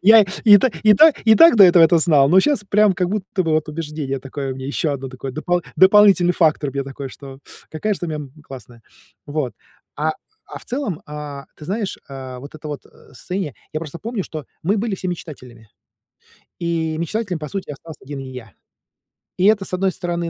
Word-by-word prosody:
Я 220 +2 +7 0.2
и 210 -2 +9
та 260 - +2
и 215 -1 +6
та 315 +8 +7
и 220 -1 +6
так 330 -3 +7
до 200 - +9
этого 175 -2 +6
это 165 +1 +5
знал, 150 -4 +4
но 185 +5 +6
щас 255 -2 0
прям 210 0 +4
как 180 0 -1
будто 200 -2 -2
бы 165 - -2
вот 155 0 0
убеждение 150 -3 -4
такое 135 0 -5
у - - -8
меня 130 0 -7
еще 145 +2 -1
одно 135 -1 -5
такое, 130 +1 -7
допол 175 +4 -1
дополнительный 190 -2 +6
фактор 155 -5 +1
мне 140 +1 -3
такой, 135 0 -8
что 135 -1 -12 0.3
какая 210 +7 -2
ж - - -10
ты 175 - -4
у - - -6
меня, 155 - -3
м, 135 -3 -10
классная. 120 -4 -12 0.4
Вот. 145 -4 -3 0.4
А 155 +2 0 0.3
а - - -9
в - - -16
целом, 245 - -3
а, 150 -1 -8
ты 150 - -12
знаешь, 200 +4 -3
а 130 -2 -8
вот 140 +4 -11
это 155 0 -9
вот 145 -1 -6
состояние, 170 +2 -7 0.2
я 155 - -3
просто 165 +1 -8
помню, 225 -3 -4
что 155 -3 -7 0.2
мы 195 +6 +1
были 215 -1 -2
все 185 -1 -5
мечтателями. 125 -10 -9 0.9
И 165 -2 -2
мечтателем, 185 +1 -3
по 150 - -6
сути, 195 -3 -5
остался 155 +2 -10
1 140 0 -7
и 135 - -8
я. 120 -6 -10 0.9
И 185 - +1
это, 210 -1 +4
с 185 - -11
одной 190 0 0
стороны, 175 -2 -3
160 Hz, 215 wpm, -20 LUFS, 140-190 Hz, 0.9 s, и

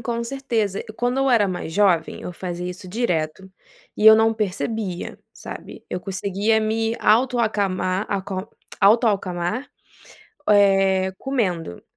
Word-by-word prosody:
Com 235 0 -3
certeza. 230 -6 -2
Quando 245 +2 0
eu 270 0 +2
era 220 -5 +4
mais 180 -3 -5
jovem, 185 -3 +2
eu 180 - -6
fazia 175 0 -5
isso 185 +1 -9
direto 180 -4 -2 0.5
e 215 - +2
eu 220 - +11
não 225 0 +3
percebia, 210 -2 -3
sabe. - - -10
Eu 180 - -3
conseguia 200 +4 0
me 225 +1 0
auto 245 +3 +3
acamar 195 -3 0
acal 190 -1 -3 0.3
auto 225 +5 +5
acalmar, 195 +4 -2 0.8
eh, 195 -2 +4
comendo. 185 - -2
200 Hz, 130 wpm, -22 LUFS, 185-225 Hz, 0.8 s, eu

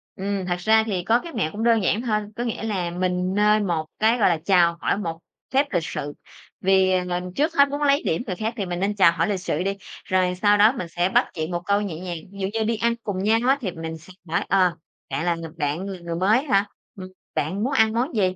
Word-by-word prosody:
Ừm, 195 0 -3
thật 175 -1 -1
ra 220 +3 +4
thì 185 -4 -2
có 230 +6 +3
cái 335 +5 -9
mẹo 185 -10 -1
cũng 215 +5 -4
đơn 230 -3 +3
giản 205 +4 +1
thôi, 220 -4 0 0.2
có 240 - -3
nghĩa 230 -2 -3
là 190 -6 -1
mình 180 +1 -1
nên 210 0 +3
một 160 -3 -1
cái, 225 +3 +3
gọi 210 - +4
là, 170 - +2
chào 175 -3 +4
hỏi - - +1
một 165 -5 -4 0.3
phép 275 +2 +3
lịch 175 - +1
sự. 145 +1 -5 0.5
Vì 190 0 +3
ng 180 0 -3
trước 310 +3 +1
hết 280 -2 +5
muốn 285 +1 -4
lấy 280 0 +3
điểm 160 - 0
người 185 - -2
khác 220 +3 -3
thì 200 - -2
mình 175 -1 -4
nên 200 +2 0
chào 190 -4 +6
hỏi 170 - 0
lịch 200 -3 -1
sự 180 - -2
đi, 195 +1 -2 0.3
rồi 185 -1 +1
sau 205 +2 +3
đó 210 +2 +6
mình 180 - -4
sẽ 175 +2 0
bắt - - +3
chuyện 160 0 -4
một 175 0 -2
câu 200 +1 +2
nhẹ 175 -6 -4
nhàng. 180 -2 -5
Ví 200 - -12
dụ 190 - -1
như 225 -1 0
đi 225 +1 0
ăn 235 +1 +1
cùng 195 -3 -3
nhau 220 +2 +3
á 275 - +4
thì 190 - -2
mình 160 -1 -6
sẽ 165 +4 -15 0.2
hỏi, 165 - 0
ờ: 185 -3 +3 0.3
"Bạn 165 - -2
là 175 -1 +2
ng 165 -1 -8
bạn 155 +5 -2
là 190 -2 -6
người 170 -1 -5
mới 205 +9 +3
hả, 200 -9 +2 0.3
ừm, 185 -3 -8 0.3
bạn 185 +8 -1
muốn 265 +4 -1
ăn 220 0 +3
món 245 +6 -1
gì? 185 -3 +1
190 Hz, 265 wpm, -23 LUFS, 175-220 Hz, 0.5 s, chào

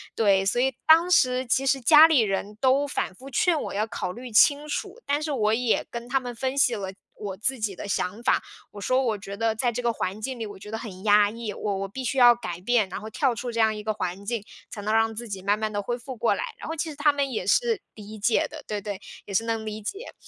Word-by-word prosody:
对， 195 -3 +3
所 240 +5 +1
以 265 +1 +2
当 330 +3 +6
时 255 -5 +3
其 270 +3 +1
实 270 -1 +2
家 310 +5 +8
里 300 -7 +4
人 205 0 -2
都 270 +2 +3
反 275 - -2
复 265 +8 -12
劝 315 +4 +2
我 - - -5
要 210 +2 0
考 180 -4 -4
虑 245 0 -9
清 285 +7 +5
楚， 410 +8 -4
但 290 +1 0
是 305 -2 -2
我 215 -3 +1
也 240 0 +1
跟 235 0 -6
他 270 +2 +1
们 245 -1 -6
分 260 +3 -3
析 250 -4 +4
了 195 -2 -5 0.2
我 200 -2 -5
自 245 +5 -2
己 210 -3 -2
的 200 - -7
想 200 +4 -2
法。 - - +3 0.3
我 205 - -10
说： 255 +6 +1
“我 220 -4 0
觉 200 0 -8
得 225 +1 0
在 245 +2 0
这 240 +1 -3
个 235 - +2
环 205 -1 -4
境 255 +1 -4
里， 225 - -3
我 205 -1 -10
觉 210 +2 -11
得 220 - -3
很 195 -4 -9
压 205 -1 +5
抑， 225 -1 -5
我 205 0 -3
我 195 - -4
必 260 +5 -6
须 270 - -2
要 240 -1 +8
改 180 -7 -6
变， 220 0 +2
然 190 +3 -6
后 220 - -7
跳 255 +1 0
出 245 +1 -4
这 230 - -4
样 220 -1 +3
一 210 - -7
个 215 0 -1
环 190 -1 -4
境， 230 0 -2 0.3
才 205 - -7
能 215 +2 -1
让 225 0 +3
自 235 +2 -7
己 195 -2 -6
慢 205 +2 +1
慢 215 -1 -2
地 205 - -1
恢 240 +4 -3
复 255 +1 -8
过 230 - +1
来。” - - -3
然 - - -8
后 - - -2
其 325 +1 -2
实 300 - -8
他 295 +1 +4
们 280 -1 -1
也 215 -7 -3
是 460 - +2
理 215 0 -10
解 215 +2 +2
的， 305 -1 -10
对 210 -1 -3
对， 200 -1 -6 0.2
也 200 - -8
是 225 - +2
能 225 -1 -2
理 215 0 -5
解。 395 - -6
225 Hz, 295 characters per minute, -25 LUFS, 205-265 Hz, 0.3 s, 家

